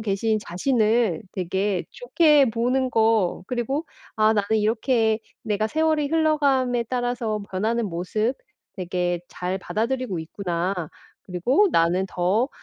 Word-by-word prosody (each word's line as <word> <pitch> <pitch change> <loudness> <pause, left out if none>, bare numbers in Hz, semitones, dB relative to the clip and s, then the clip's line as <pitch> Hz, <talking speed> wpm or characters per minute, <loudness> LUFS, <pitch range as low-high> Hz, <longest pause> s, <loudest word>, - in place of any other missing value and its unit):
계신 215 +1 0
자신을 215 - +1
되게 190 +1 -1
좋게 310 - +3
보는 250 +3 0
거 220 -6 +2
그리고 260 +6 -2 0.3
'아 215 0 +4
나는 205 0 0
이렇게 220 0 +1 0.2
내가 215 -1 0
세월이 315 +2 +1
흘러감에 280 -6 +2
따라서 245 -3 -2
변하는 220 +4 0
모습 215 +8 -1 0.4
되게 180 -1 -1
잘 180 +2 -3
받아들이고 225 -3 -2
있구나. 175 +2 -3 0.5
그리고 245 - +2
나는 175 +3 +2
더 195 +9 +1
220 Hz, 260 characters per minute, -24 LUFS, 190-255 Hz, 0.5 s, 아